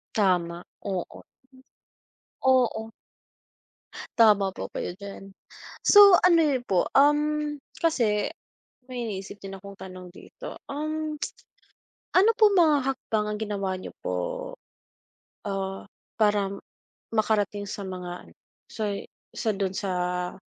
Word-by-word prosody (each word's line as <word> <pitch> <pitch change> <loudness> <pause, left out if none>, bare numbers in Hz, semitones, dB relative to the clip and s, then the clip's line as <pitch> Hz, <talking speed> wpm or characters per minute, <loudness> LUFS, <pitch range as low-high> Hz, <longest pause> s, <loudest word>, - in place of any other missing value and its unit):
Tama, 180 -4 +1 0.2
oo, 190 -3 -4 1.2
oo. 245 -4 +2 1.3
Tama 205 -4 +6
po 190 - -6
kayo 175 - -4
diyan, 200 -1 -9 0.6
so 405 -3 +9
ano 340 -2 +6
niyo 270 -6 +1
po 185 -2 +1
um, 295 +1 +3 0.2
kasi 235 -9 +1 0.6
may 245 -2 -4
iniisip 195 -2 -6
din 195 -1 -9
akong 200 +1 -10
tanong 185 -1 -9
dito 175 - -10
um. 310 +1 -3 1.0
Ano 395 +5 +6
po 430 -3 +6
mga 310 -7 +4
hakbang 220 -5 -2
ang 210 0 -3
ginawa 200 -3 -2
niyo - - -7 0.2
po? - - -2 1.3
Ah, 195 -1 -3 0.4
para 205 -2 +3 0.7
makarating 205 -2 0
sa 200 0 -5
mga 180 -1 -6
ano - - -20 0.4
sa 220 - -3 0.5
sa 225 - -2
dun 195 -1 -2
sa 180 -2 -2
210 Hz, 110 wpm, -26 LUFS, 195-280 Hz, 1.3 s, so